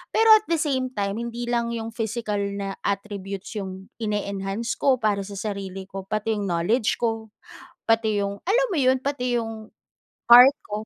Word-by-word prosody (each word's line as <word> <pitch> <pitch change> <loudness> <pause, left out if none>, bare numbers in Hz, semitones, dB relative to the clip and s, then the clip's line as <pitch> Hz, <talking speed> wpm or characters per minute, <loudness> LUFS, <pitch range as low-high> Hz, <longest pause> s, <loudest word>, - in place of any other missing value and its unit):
Pero, 450 0 +4
at 430 - -7
the 335 - +2
same 265 -4 0
time, 200 +1 -2
hindi 235 0 -5
lang 235 -1 0
'yong 225 0 -5
physical 220 -2 -3 0.2
na 195 -1 -4
attributes 200 0 -4
'yong 190 0 -7
ini-enhance 205 +1 -2
ko, 270 -2 +4
para 210 -4 0
sa 200 - -8
sarili 195 -2 -5
ko, 195 0 -7
pati 215 +1 -1
'yong 205 - -2
knowledge 200 +7 +1
ko, 225 -2 -2 0.6
pati 220 -2 +2
'yong, 200 0 -3
alam - - +3
mo 340 - 0
'yon, 260 -1 +3
pati 250 -3 -1
'yong, 225 -1 -6 0.6
art 250 +3 +10
ko. 210 +1 -5
220 Hz, 170 wpm, -24 LUFS, 200-240 Hz, 0.6 s, art